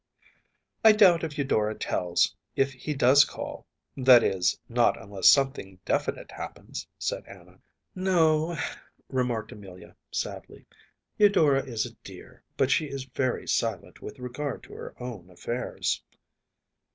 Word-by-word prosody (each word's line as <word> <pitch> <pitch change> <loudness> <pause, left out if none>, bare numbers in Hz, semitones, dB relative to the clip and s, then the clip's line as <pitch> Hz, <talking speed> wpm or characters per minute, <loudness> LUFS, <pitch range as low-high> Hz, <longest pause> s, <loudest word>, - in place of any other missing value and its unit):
“I 220 -1 +9
doubt 185 -6 +5
if 155 -3 -4
Eudora 110 -6 0
tells, 90 -3 0 0.2
if 135 0 +1
he 145 +4 -5
does 135 +1 +6
call - - -7 0.3
that 125 -3 +7
is, 90 -2 +1
not - - +2
unless 100 -3 +3
something 135 -9 +2
definite - - -2
happens,‚ÄĚ - - -8
said - - -3
Anna. - - -15 0.4
‚ÄúNo,‚ÄĚ 165 -4 +1 0.3
remarked 120 -4 -1
Amelia, 95 -4 -12
sadly. - - -6 0.5
“Eudora 155 -10 +4
is 115 -4 -2
a 120 - -9
dear, 95 -2 -13 0.2
but 135 0 +2
she 150 +2 +2
is 140 -2 -5
very 130 -1 -2
silent 110 -6 -2
with 105 - -8
regard 130 +2 -5
to - - -13
her - - -9
own 115 -8 -7
affairs. 120 +7 -3
130 Hz, 130 wpm, -27 LUFS, 105-145 Hz, 0.5 s, I